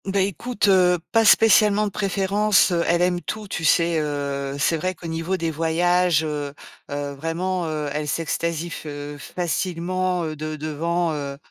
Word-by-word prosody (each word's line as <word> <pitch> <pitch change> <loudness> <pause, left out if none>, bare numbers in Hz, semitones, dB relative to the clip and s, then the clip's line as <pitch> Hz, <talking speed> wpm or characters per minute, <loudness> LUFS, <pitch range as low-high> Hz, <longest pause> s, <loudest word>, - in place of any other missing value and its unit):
Ben 195 0 +1
écoute, 205 +4 -2
heu, 180 -2 +5
pas 225 -1 +4
spécialement 215 -1 +5
de 205 - -3
préférence, 200 0 +2
heu, 170 -1 +1
elle 175 +1 +3
aime 180 -1 +1
tout, 215 +6 -5
tu 170 - -4
sais, 165 0 +3
heu, 140 -2 -3
c'est 140 +4 +2
vrai 185 +4 -2
qu'au 170 - -13
niveau 165 +3 -2
des 165 -2 -2
voyages, 165 +1 +2
heu 145 -2 -4 0.3
heu, 145 0 -3
vraiment, 170 +4 -2
heu, 155 -1 -3
elle 150 0 -3
s'extasie 165 +2 -2
f 160 - -7
heu, 145 0 -7
facilement, 180 +2 -2
heu, 155 -1 -4
de 155 +1 -5
devant, 165 +3 -1
heu 140 -2 -5
170 Hz, 170 wpm, -23 LUFS, 155-185 Hz, 0.3 s, heu